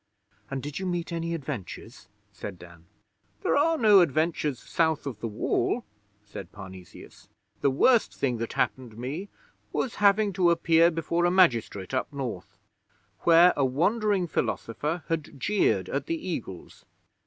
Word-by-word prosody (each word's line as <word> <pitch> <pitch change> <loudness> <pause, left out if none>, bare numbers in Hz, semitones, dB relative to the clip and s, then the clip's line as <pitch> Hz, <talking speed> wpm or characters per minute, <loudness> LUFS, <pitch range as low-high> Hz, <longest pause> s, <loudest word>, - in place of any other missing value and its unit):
'And 135 -1 -4
did 145 +2 -5
you 190 - -3
meet 175 -1 -3
any 170 0 -2
adventures?' 135 - -7 0.3
said 100 -3 -7
Dan. 85 -1 -15 0.6
'There - - +2
are 320 +3 +3
no 210 -6 +6
adventures 155 -3 0
South 160 +2 0
the 120 -5 -5
Wall,' 120 - -1 0.4
said 100 -3 -9
Parnesius. 95 -3 -12 0.3
'The 140 - +2
worst 225 - +3
thing 125 -4 -1
that 115 - -4
happened 120 -4 -2
me 145 - -5 0.4
was 245 - -2
having 200 0 +4
to 180 -2 +3
appear 170 0 +4
before 170 +1 -1
a - - +4
magistrate 120 - +2
up 130 - -1
North, 125 -10 -6 0.6
where 170 +1 +6
a 140 - +1
wandering 195 - +1
philosopher 150 +3 -2
had 155 -4 -4
jeered 210 +8 +1
at - - -3
the 330 - -1
Eagles. 120 - -7
160 Hz, 140 wpm, -27 LUFS, 120-180 Hz, 0.6 s, no